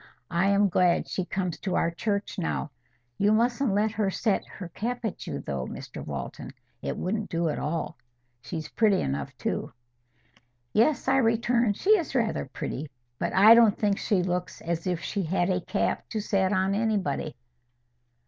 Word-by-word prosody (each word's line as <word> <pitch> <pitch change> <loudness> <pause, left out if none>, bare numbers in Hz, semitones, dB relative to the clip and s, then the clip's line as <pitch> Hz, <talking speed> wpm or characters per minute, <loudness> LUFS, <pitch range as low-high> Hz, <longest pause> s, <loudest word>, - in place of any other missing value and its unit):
I 170 +3 +2
am 200 +1 +4
glad 180 -1 +2
she 185 - -2
comes 180 -2 -3
to 190 - -2
our 165 - +2
church 200 +3 -2
now. 165 -3 -2 0.5
You 205 +1 +4
mustn't 240 +3 +2
let 210 +2 +2
her 210 -2 0
set 200 +1 0
her 185 - -8
cap 240 +6 -3
at 220 - -4
you, - - -4
though, 65 -3 -4
Mr - - -8
Walton. 70 -3 -6 0.3
It - - -3
wouldn't 210 +3 -2
do 165 -1 0
at - - -2
all. 155 -1 -3 0.4
She's 160 +4 -5
pretty 210 -4 +3
enough, 70 +1 -3
too!" - - -2 1.0
"Yes," 245 +5 +3
I 265 0 +4
returned, 230 -2 +2
"she 410 - +2
is 310 -5 -5
rather 230 -4 +1
pretty. 140 +2 -5 0.3
But - - -1
I 205 +4 +9
don't 230 -3 +6
think 205 -2 +1
she 195 -5 +1
looks 180 0 -2
as 170 +1 -3
if 175 -2 -1
she 200 - -2
had 175 +1 +1
a 180 0 0
cap 205 - -1
to 220 - -2
set 195 -2 +1
at 190 0 +2
anybody." 205 -7 -1
195 Hz, 175 wpm, -27 LUFS, 170-220 Hz, 1.0 s, I